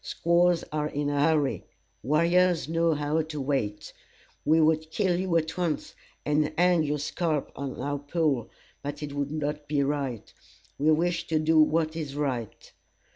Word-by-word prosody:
Squaws 170 0 +2
are 150 0 -1
in 145 -1 -2
a 145 - 0
hurry; 150 -2 +2 0.4
warriors 170 +5 +2
know 165 0 +1
how 150 +2 0
to 155 -1 -6
wait. 130 -7 -2 0.5
We 160 +2 +4
would 160 0 +2
kill 180 0 0
you 185 -2 +1
at 160 -1 -2
once, 170 -4 -2 0.3
and 150 0 +1
hang 180 -1 +4
your 150 -1 0
scalp 150 0 -2
on 140 -1 -5
our 145 +2 -2
pole, 145 -5 -1 0.3
but 145 +1 -5
it 145 -1 -5
would 145 0 -2
not 150 -1 -3
be 145 -1 +1
right. 135 -5 -3 0.5
We 155 +3 +4
wish 170 +2 +1
to 160 - +1
do 155 +1 +3
what 155 +1 +2
is 150 -4 -5
right. 130 -7 -4
155 Hz, 165 wpm, -27 LUFS, 145-165 Hz, 0.5 s, We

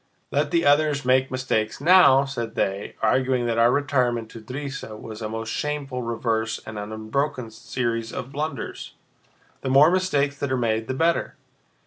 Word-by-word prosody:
Let - - +1
the 335 - +1
others 145 -1 +3
make 130 +1 +3
mistakes 125 -4 -1
now!" 145 -4 +6
said 125 -4 -5
they, 100 +1 -2
arguing 130 +2 +2
that 115 -1 0
our 120 +1 +5
retirement 125 -5 0
to 115 - -10
Drissa 130 -2 -6
was 110 0 -9
a 110 - -3
most 110 0 -4
shameful 145 -4 -3
reverse 115 -1 -1
and 110 -1 -6
an 105 +1 -6
unbroken 115 +3 -2
series 115 0 -3
of 125 - -6
blunders. 155 +3 -5 0.7
"The 130 - -3
more 140 +5 +6
mistakes 145 -7 +1
that 140 -2 -2
are 130 - +1
made 110 -2 0
the 130 - -2
better. 165 +4 +1
125 Hz, 165 wpm, -24 LUFS, 115-140 Hz, 0.7 s, now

